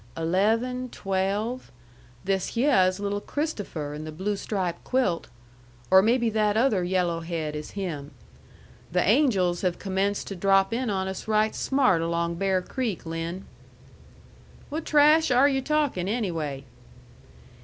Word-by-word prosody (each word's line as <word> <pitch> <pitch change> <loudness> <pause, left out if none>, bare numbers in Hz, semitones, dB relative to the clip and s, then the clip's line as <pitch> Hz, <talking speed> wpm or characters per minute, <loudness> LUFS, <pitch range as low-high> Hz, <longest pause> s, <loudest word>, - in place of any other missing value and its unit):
"Eleven, 225 +9 0
twelve. 200 +5 -2 0.5
This 195 +2 -1
hyeh 230 -7 +4
is 185 +1 -2
little 205 0 -2
Christopher 205 - -4
in 150 +1 -6
the 155 - -6
blue 190 +6 -2
stripe 185 -4 -3
quilt 245 -10 0 0.6
or 190 0 +8
maybe 235 +3 +2
that 215 -1 +1
other 225 -6 +2
yello' 175 -2 0
head 165 -2 -4
is 150 0 -7
him. 155 -8 -4 0.8
The 180 +1 +1
angels 200 - +3
have 180 -2 0
commenced 195 +1 -1
to 195 - -5
drop 195 +3 +3
in 245 0 -1
on 190 -2 -1
us 190 +2 -6
right 215 0 +2
smart 255 -11 +2
along 170 0 -1
Bear 190 0 +1
Creek, 230 -5 -3
Lin." 165 +3 -5 1.2
"What 310 +2 -4
trash 305 +1 +5
are 255 +3 +5
yu' 270 -2 +1
talkin' 290 -11 0
anyway?" 165 - -2
195 Hz, 140 wpm, -26 LUFS, 175-235 Hz, 1.2 s, or